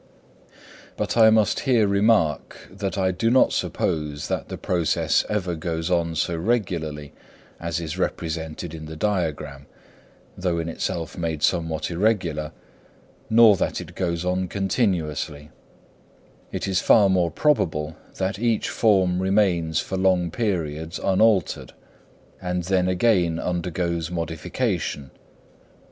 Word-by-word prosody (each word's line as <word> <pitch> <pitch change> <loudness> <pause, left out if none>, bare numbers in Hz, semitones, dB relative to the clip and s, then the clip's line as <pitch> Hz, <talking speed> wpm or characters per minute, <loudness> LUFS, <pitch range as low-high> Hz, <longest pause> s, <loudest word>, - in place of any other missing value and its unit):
But - - -2
I 110 -1 +7
must 110 -2 +3
here 120 -6 +3
remark 100 -6 +2
that 100 +1 -4
I 95 -1 +2
do 115 +5 0
not 130 +2 +4
suppose 75 -2 -2
that - - -3
the - - -5
process 85 -4 +1
ever 95 -4 -1
goes 80 +1 -3
on 85 -2 +1
so 85 +2 0
regularly 80 -7 -2 0.5
as 85 0 -2
is 85 +2 -5
represented 80 -1 -3
in 80 -1 -8
the 80 - -8
diagram, 75 -7 -2 0.7
though 90 -2 -1
in 85 0 -2
itself 85 +1 -4
made 80 -3 -2
somewhat 80 -2 0
irregular, 85 -5 0 0.8
nor 110 -2 +7
that - - -1
it - - -9
goes 85 -2 -2
on 90 0 0
continuously; 85 - -1 1.0
it - - -3
is 95 -2 +1
far 105 -3 +5
more 90 -3 +2
probable 80 - 0 0.2
that 95 +1 -2
each 115 -2 0
form 95 -5 +2
remains 90 -5 +2
for 95 - -4
long 90 -2 +2
periods 80 -6 -2
unaltered, 100 +1 +1 0.7
and 90 -1 -2
then 90 0 +1
again 90 -3 +2
undergoes 85 -1 -2
modification. 80 -4 -3
90 Hz, 125 wpm, -24 LUFS, 80-95 Hz, 1.0 s, I